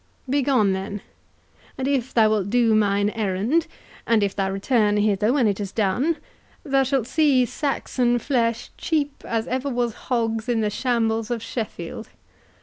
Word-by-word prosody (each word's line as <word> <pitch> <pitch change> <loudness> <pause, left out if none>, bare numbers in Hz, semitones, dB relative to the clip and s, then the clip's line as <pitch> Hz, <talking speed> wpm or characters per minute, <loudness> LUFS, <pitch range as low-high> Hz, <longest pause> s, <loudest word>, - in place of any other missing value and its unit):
"Begone, 255 -7 +2
then; 195 +1 -4 0.8
and 265 0 -2
if 265 -3 0
thou 220 -2 +4
wilt 205 -3 0
do 235 -1 +3
mine 205 -1 +2
errand, 220 - 0 0.4
and 225 -3 +3
if 200 - -1
thou 195 -1 0
return 210 +1 +1
hither 210 +1 +2
when 265 -3 +2
it 200 -1 0
is 200 -2 -4
done, 245 - 0 0.5
thou 275 -4 +2
shalt 265 -3 0
see 270 -1 +3
Saxon 245 -2 0
flesh 235 -2 -1
cheap 290 -3 -1
as 225 -1 -2
ever 260 +2 -2
was 240 -3 -1 0.2
hog's 225 -2 0
in 230 -2 +1
the 210 -1 0
shambles 225 -1 0
of 235 -2 -3
Sheffield. 220 -2 -5
230 Hz, 155 wpm, -23 LUFS, 210-260 Hz, 0.8 s, thou